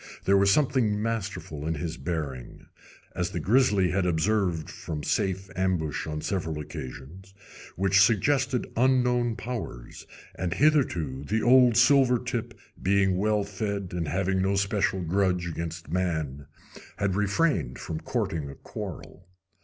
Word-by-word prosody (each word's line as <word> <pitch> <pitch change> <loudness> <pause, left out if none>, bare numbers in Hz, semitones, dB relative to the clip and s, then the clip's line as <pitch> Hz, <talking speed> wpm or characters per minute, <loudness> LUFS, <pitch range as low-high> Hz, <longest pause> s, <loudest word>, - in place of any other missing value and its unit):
There 100 - +4
was 100 0 +4
something 125 -3 +2
masterful 100 -9 -4
in 80 - -1
his 80 +2 -4
bearing 75 -9 -5 0.5
as - - -2
the - - -4
grizzly 105 - +3
had 90 -1 +1
observed 90 -1 0
from 75 -2 -6
safe 95 0 -1
ambush 90 -5 -1
on 75 0 -4
several 85 -5 -2
occasions 80 +7 -9 0.4
which 95 +1 +3
suggested 130 +5 +2
unknown 125 -1 +2
powers, 110 - -7 0.3
and 90 0 -3
hitherto 95 - +1
the 110 +8 -1
old 125 -1 +6
silver 125 0 +5
tip, 120 -2 -4 0.2
being 95 0 +2
well 105 0 +1
fed 100 -1 -4
and 85 -3 -3
having 95 +2 0
no 95 +1 +1
special 100 -2 0
grudge 90 0 +1
against 80 -2 -5
man, 80 -6 -2 0.5
had 100 -2 0
refrained 100 - 0
from 80 - -5
courting 75 -4 -2
a 70 - -9
quarrel. - - -8
95 Hz, 135 wpm, -27 LUFS, 80-110 Hz, 0.5 s, old